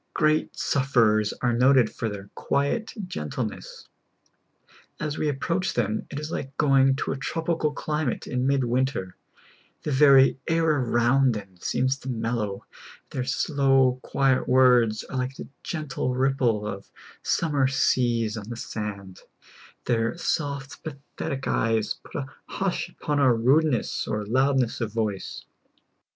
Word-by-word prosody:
Great 155 -1 +1
sufferers 115 -6 +2
are 120 -1 +2
noted 125 0 +5
for 115 - -4
their 100 -1 -8
quiet 140 +11 -1
gentle 75 - -3
ness. - - -9 1.1
As 150 0 -3
we 155 - +1
approach 170 +6 -1
them, 110 -2 -1
it 145 - -5
is 150 +1 -6
like 135 -4 -5
going 135 -2 +4
to - - -2
a 135 - -2
tropical 160 +2 -1
climate 150 -3 -2
in 125 +1 -1
mid 135 -1 +2
winter; 120 -6 -1 0.7
the 150 - -2
very 135 -1 +6
air 165 0 +2
around 130 -3 +3
them 100 -3 -8
seems 130 +6 -1
mellow; 115 -5 -3 0.5
their 130 - -2
slow, 135 -1 +2
quiet 135 -2 +1
words 125 -4 +4
are 130 - -6
like 130 +1 -3
the - - -8
gentle 140 -6 -3
ripple 130 -5 +1
of 100 -2 -6 0.3
summer 145 -5 +1
seas 120 -4 +1
on 105 0 -7
the 120 - -5
sand; 100 -5 -6 0.7
their 115 +5 0
soft, 140 -5 -3
pathetic 140 -2 -6
eyes 115 -2 +1
put - - -14
a 145 -4 -2 0.2
hush 190 -2 -2
upon 150 -4 -2
our 130 -4 +5
rudeness 135 +4 +2
or 105 -1 -2
loudness 130 +1 +1
of 110 -2 -2
voice. 105 -4 -3
130 Hz, 140 wpm, -25 LUFS, 115-140 Hz, 1.1 s, very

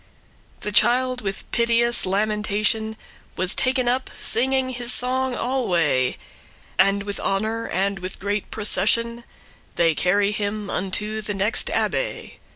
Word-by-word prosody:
The 210 - -4
child, 250 +4 +4
with 195 -1 -5
piteous 235 -1 +3
lamentation, 210 +2 0 0.4
Was 185 +2 -1
taken 255 -1 +1
up, 255 +2 0
singing 260 +2 +1
his 245 -1 0
song 255 +1 +1
alway: 175 - 0 0.6
And 195 +1 +3
with 205 -1 -5
honour 220 +4 -2
and 195 +1 -1 0.2
great 205 +1 -3
procession, 230 +3 +1 0.5
They 165 -2 +3
crry 200 +5 +1
him 210 -1 -4
unto 210 +3 -2
the 210 -1 -4
next 200 +3 0
abbay. - - -2
215 Hz, 120 wpm, -22 LUFS, 200-240 Hz, 0.6 s, child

